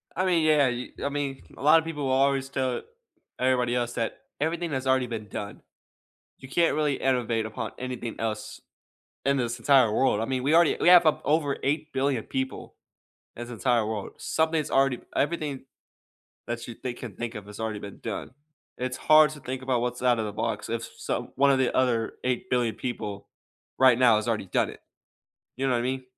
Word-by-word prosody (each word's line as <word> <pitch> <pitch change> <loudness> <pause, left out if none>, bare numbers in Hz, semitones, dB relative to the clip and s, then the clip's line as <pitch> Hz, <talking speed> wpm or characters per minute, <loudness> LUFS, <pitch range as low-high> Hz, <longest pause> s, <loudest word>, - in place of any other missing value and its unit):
I 185 - +1
mean, 175 -4 +3
yeah, 150 -3 +4
y 125 0 -4
I 140 - 0
mean, 140 -2 -3 0.2
a - - -11
lotta 160 +2 +6
people 150 -4 -4
will 130 - 0
always 135 0 +2
tell 130 -2 -1 0.6
everybody 125 -1 +2
else 120 -1 -1
that 115 - -3 0.2
everything 165 +2 -1
has 130 -1 -2
already 130 -1 +2
been 110 -3 -5
done. 100 +1 -6 0.8
You 130 - -10
can't 165 +5 +2
really 150 -2 +1
innovate 120 -4 0
upon 110 - -5
anything 125 -3 -5
else 110 -2 -4 0.6
in 140 0 +3
this 120 -1 -2
entire 130 -2 +5
world. 130 -5 +2
I - - 0
mean, 130 0 -2
we 145 - +2
already 170 -1 +5
we - - +5
have 175 -2 +8
up 155 - +3
over 145 -2 +1
8,000,000,000 140 -4 0
people 130 0 -4 0.6
in 120 - -5
this 120 - -9
entire 120 -1 +1
world. 110 -3 -4
Something's 160 -1 0
already 135 -2 +2 0.2
everything 150 -2 -1 0.9
that 120 0 -4
you 120 - -6
think 125 +1 -6
of 115 -4 -7
think 120 0 -4
of 105 -2 -7
has 105 +1 -11
already 110 -2 -3
been 100 -1 -9
done. - - -5 0.5
It's 125 0 -3
hard 155 0 +6
to 150 - -9
think 130 -1 -5
about 130 -2 0
what's 125 0 -3
outta 120 -3 +3
the 105 - -4
box 110 0 -2
if 115 0 -2
s - - -8
some - - -3
one 140 +1 +4
of 135 - +2
the 130 - +1
other 120 -3 +1
8,000,000,000 125 -2 0
people 105 -5 -5 0.5
right 130 -3 +6
now 120 -4 +5
has 110 - -3
already 110 -4 -1
done - - +1
it. - - -11 0.7
You 135 - -2
know 130 - +2
what 120 - +2
I - - -1
mean? 130 +1 -2
130 Hz, 200 wpm, -27 LUFS, 115-140 Hz, 0.9 s, have